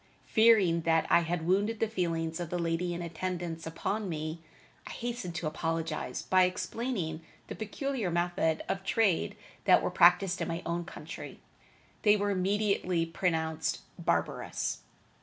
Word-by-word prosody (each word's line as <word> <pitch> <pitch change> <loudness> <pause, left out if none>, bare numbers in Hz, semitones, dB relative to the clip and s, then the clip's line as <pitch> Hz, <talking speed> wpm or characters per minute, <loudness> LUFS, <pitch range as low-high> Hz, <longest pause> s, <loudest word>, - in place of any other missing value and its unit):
Fearing 215 -7 +5
that 165 0 +2
I - - +7
had 170 -1 -2
wounded 205 +5 +1
the 225 - +2
feelings 165 -5 -2
of 175 -2 -4
the 180 - -2
lady 170 +1 -1
in 175 - -4
attendance 170 -1 -4
upon 195 +5 -2
me, 155 0 -4 0.5
I - - -7
hastened 235 -8 -4
to 175 - -3
apologize 160 -4 -2
by 185 -1 +4
explaining 185 -3 -3 0.3
the - - -3
peculiar 230 0 -2
methods 170 -2 +1
of 195 - -2
trade 205 -3 +1 0.3
that - - +6
were - - 0
practiced 190 -2 +5
in - - -1
my 170 0 -3
own 170 0 -2
country. 175 - -8 0.6
They 210 0 +5
were 205 0 0
immediately 195 -3 +1
pronounced 160 -2 -1 0.2
barbarous. - - -1
175 Hz, 145 wpm, -30 LUFS, 165-200 Hz, 0.6 s, I